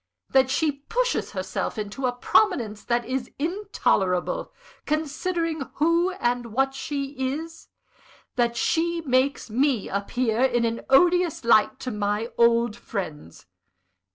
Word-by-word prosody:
_ - - -29
that 265 -1 +5
she 305 +3 +2
pushes 470 - -2
herself - - -3
into 215 +5 -3
a - - +1
prominence 245 - +1
that 240 -1 0
is 255 0 -3
intolerable, 310 - 0 0.4
considering 320 +1 -1
who 335 +4 +3
and 245 -7 -1
what 270 +4 0
she 275 0 -4 0.3
is 325 +1 -10 0.7
that 235 -2 +1
she 340 +4 +1
makes 260 -4 0
me 260 -1 +1
appear 225 +4 -1
in 240 -3 +3
an 230 0 -2
odious 345 +1 +4
light 215 -2 +4
to 255 - -4
my 210 +2 -2
old 235 -1 +4
friends. 160 - -7
260 Hz, 125 wpm, -25 LUFS, 230-320 Hz, 0.7 s, that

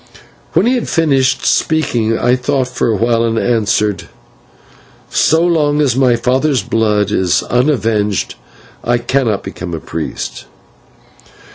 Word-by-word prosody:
When 175 +5 +3
he 245 - +2
had 250 - -2
finished 140 -5 +1
speaking 120 -8 +1
I 125 +1 +2
thought 130 0 -1
for 125 - -1
a 110 - +1
while, 115 +2 +1
and 115 -1 0
answered: 105 -4 0 1.0
"So 165 +2 +3
long 150 -4 +1
as 140 -5 +2
my 130 -2 +3
father's 130 +1 0
blood 105 -2 0
is 95 -4 +1
unavenged 115 -6 0 0.5
I 120 0 +1
cannot 120 -3 -1
become 85 -1 -6
a - - -5
priest." 80 0 -6
120 Hz, 130 wpm, -15 LUFS, 110-140 Hz, 1.0 s, When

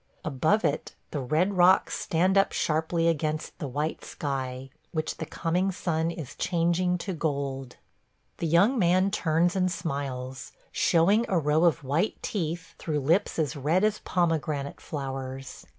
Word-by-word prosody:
Above 160 +9 +2
it 145 - -1 0.2
the 150 - -2
red 155 +9 +1
rocks 180 +1 +5
stand 185 +4 +1
up 195 0 +4
sharply 160 +2 0
against 155 -1 -1
the 145 - -3
white 150 +5 -3
sky, 135 -2 -4 0.2
which 155 -2 -2
the - - -5
coming 180 +4 0
sun 165 -4 -1
is 160 -6 -6
changing 175 +1 +1
to 190 +2 -4
gold. 140 -5 -3 0.6
The 170 - -1
young 200 - +4
man 185 +1 +3
turns 170 -2 +1
and 185 -1 +1
smiles, 135 -6 -4 0.2
showing 195 +7 +3
a 185 - +2
row 155 +1 +3
of 165 -2 +2
white 150 +10 0
teeth 165 -3 -3
through 150 -3 -1
lips 170 +9 +2
as 160 -1 0
red 155 +7 +1
as 215 0 +2
pomegranate 155 -5 -1
flowers. 135 -2 -6
160 Hz, 150 wpm, -27 LUFS, 145-180 Hz, 0.6 s, rocks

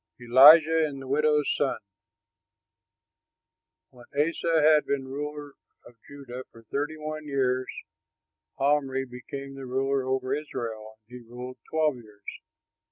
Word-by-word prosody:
ELIJAH 155 +7 +7
AND 140 -2 -8
THE 135 - -9
WIDOW'S 150 +1 +2
SON 145 - 0 2.1
When 120 -1 -16
Asa 165 +2 +1
had 155 0 +4
been 135 -2 -2
ruler 145 +1 -6 0.3
of - - -15
Judah 130 -3 -9
for 115 - -16
thirty 150 +3 -2
one 155 0 -6
years 130 -2 0 0.9
Omri 135 -1 +1
became 135 +2 -9
ruler 135 +1 -1
over 130 0 -1
Israel, 115 -7 -5
and 125 +1 -11
he 115 - -20
ruled 125 +1 -8
twelve 155 -4 +1
years. 105 -3 -17
135 Hz, 120 wpm, -26 LUFS, 125-150 Hz, 2.1 s, ELIJAH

